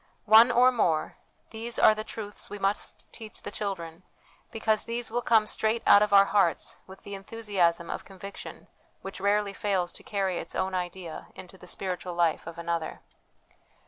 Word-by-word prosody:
One 220 Hz, +3 st, +8 dB
or 250 Hz, +1 st, +5 dB
more, 170 Hz, -10 st, 0 dB, 0.3 s
these 230 Hz, +1 st, -5 dB
are -, -, +7 dB
the 215 Hz, 0 st, -5 dB
truths 210 Hz, -2 st, -7 dB
we 205 Hz, -, -6 dB
must 195 Hz, +1 st, -2 dB
teach 220 Hz, -2 st, -8 dB
the -, -, -5 dB
children, 175 Hz, -5 st, -5 dB, 0.5 s
because 220 Hz, -1 st, 0 dB
these 235 Hz, 0 st, -4 dB
will 240 Hz, +1 st, 0 dB
come 225 Hz, -3 st, +4 dB
straight 220 Hz, +2 st, 0 dB
out 200 Hz, -, +8 dB
of 210 Hz, -, +2 dB
our 200 Hz, 0 st, +8 dB
hearts 195 Hz, -5 st, +1 dB
with 190 Hz, 0 st, -13 dB
the 200 Hz, -, -8 dB
enthusiasm 195 Hz, -5 st, -1 dB
of -, -, -5 dB
conviction 195 Hz, +1 st, -10 dB, 0.4 s
which 195 Hz, -1 st, -7 dB
rarely 200 Hz, 0 st, +1 dB
fails 195 Hz, -5 st, -1 dB
to -, -, -11 dB
carry 195 Hz, -3 st, -1 dB
its 165 Hz, -, -7 dB
own 190 Hz, 0 st, -1 dB
idea 180 Hz, -2 st, -5 dB
into 185 Hz, +1 st, -11 dB
the -, -, -14 dB
spiritual 180 Hz, -2 st, -4 dB
life 170 Hz, -2 st, +1 dB
of 165 Hz, 0 st, -8 dB
another. 170 Hz, -1 st, -3 dB
200 Hz, 175 wpm, -28 LUFS, 180-215 Hz, 0.5 s, One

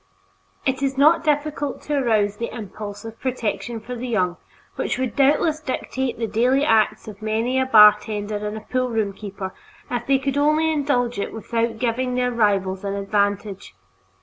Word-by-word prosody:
It 265 Hz, 0 st, 0 dB
is 270 Hz, -1 st, -1 dB
not 310 Hz, +4 st, +5 dB
difficult 295 Hz, -1 st, -1 dB
to 300 Hz, -, -3 dB
arouse 215 Hz, -7 st, +1 dB
the 235 Hz, -, -3 dB
impulse 210 Hz, -1 st, -7 dB
of 225 Hz, 0 st, -9 dB
protection 240 Hz, -2 st, -3 dB
for 235 Hz, +3 st, -8 dB
the 245 Hz, +1 st, -5 dB
young, 180 Hz, -7 st, 0 dB, 0.4 s
which -, -, -2 dB
would 260 Hz, -1 st, -2 dB
doubtless 300 Hz, +3 st, +3 dB
dictate 265 Hz, -3 st, -3 dB
the 230 Hz, -, -1 dB
daily 250 Hz, +6 st, +2 dB
acts 215 Hz, -2 st, +2 dB
of 210 Hz, -1 st, -10 dB
many 225 Hz, +4 st, 0 dB
a 260 Hz, -, 0 dB
bartender 210 Hz, -2 st, +5 dB
and 210 Hz, +1 st, -6 dB
poolroom 230 Hz, -5 st, 0 dB
keeper 195 Hz, -2 st, -7 dB, 0.4 s
if 240 Hz, -1 st, -3 dB
they 275 Hz, 0 st, +4 dB
could 275 Hz, +1 st, -2 dB
only 305 Hz, +2 st, +3 dB
indulge 250 Hz, -7 st, 0 dB
it -, -, -3 dB
without 230 Hz, 0 st, -2 dB
giving 250 Hz, +1 st, -1 dB
their 250 Hz, 0 st, +1 dB
rivals 195 Hz, -4 st, +1 dB
an 200 Hz, 0 st, -2 dB
advantage. 200 Hz, -, -1 dB
230 Hz, 165 wpm, -22 LUFS, 210-265 Hz, 0.4 s, not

